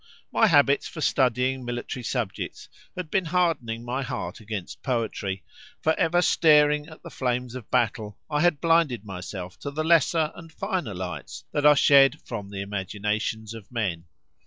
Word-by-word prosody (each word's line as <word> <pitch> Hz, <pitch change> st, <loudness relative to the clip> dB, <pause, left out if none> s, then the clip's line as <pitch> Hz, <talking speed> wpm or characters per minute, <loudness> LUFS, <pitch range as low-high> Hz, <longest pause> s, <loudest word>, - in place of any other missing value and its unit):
My 225 Hz, -, +4 dB
habits 145 Hz, -5 st, +4 dB
for 165 Hz, -, -9 dB
studying 130 Hz, -2 st, +1 dB
military 120 Hz, +2 st, -4 dB
subjects 115 Hz, -4 st, -4 dB, 0.3 s
had 180 Hz, -4 st, -6 dB
been 190 Hz, -2 st, +1 dB
hardening 160 Hz, -10 st, 0 dB
my 125 Hz, +3 st, -2 dB
heart 130 Hz, -1 st, -5 dB
against 105 Hz, -4 st, -6 dB
poetry; 110 Hz, -6 st, -2 dB, 0.4 s
for 160 Hz, -, +2 dB
ever 175 Hz, +3 st, +2 dB
staring 150 Hz, -3 st, +4 dB
at 160 Hz, -1 st, -14 dB
the -, -, -9 dB
flames 125 Hz, -1 st, -2 dB
of 125 Hz, -4 st, -8 dB
battle, 110 Hz, -4 st, 0 dB
I 150 Hz, -1 st, 0 dB
had 165 Hz, -4 st, +3 dB
blinded 165 Hz, -9 st, +2 dB
myself 90 Hz, -1 st, -7 dB
to 140 Hz, -, -5 dB
the 155 Hz, +2 st, -3 dB
lesser 160 Hz, -1 st, +3 dB
and 165 Hz, -1 st, -12 dB
finer 180 Hz, -, -3 dB
lights 90 Hz, -4 st, -6 dB
that 145 Hz, 0 st, +3 dB
are 150 Hz, -, +8 dB
shed 140 Hz, -1 st, +6 dB
from 105 Hz, -5 st, -6 dB
the 100 Hz, -1 st, -5 dB
imaginations 105 Hz, +2 st, -3 dB
of 115 Hz, -1 st, -11 dB
men. 95 Hz, -9 st, -2 dB
125 Hz, 160 wpm, -26 LUFS, 110-155 Hz, 0.4 s, are